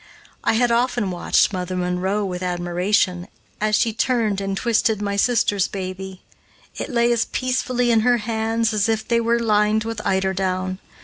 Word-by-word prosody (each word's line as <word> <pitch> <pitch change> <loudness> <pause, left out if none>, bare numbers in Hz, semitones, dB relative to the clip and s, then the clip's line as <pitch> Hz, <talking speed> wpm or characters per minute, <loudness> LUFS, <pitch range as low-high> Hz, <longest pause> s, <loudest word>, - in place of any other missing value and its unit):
I - - +2
had 240 +1 +2
often 235 -4 +1
watched 175 +3 +2
"Mother 185 0 -3
Monroe" 180 +3 -1
with 180 -1 -4
admiration, 180 +1 0 0.3
as 215 0 +2
she 225 0 +1
turned 220 -4 0
and 195 0 -3
twisted 225 -2 +1
my 200 -1 -2
sister's 205 -3 +2
baby. 190 -1 -6 0.5
It - - -5
lay 235 -2 +2
as 235 -1 +1
peacefully 255 -1 0
in 225 - +4
her 245 +2 +3
hands 225 0 -1
as 210 +1 +1
if 220 -1 -1
they 235 -1 +2
were 230 +1 +2
lined 215 -1 +2
with 225 -1 -4
eider 190 0 0
down. 185 0 -2
210 Hz, 170 wpm, -21 LUFS, 190-230 Hz, 0.5 s, in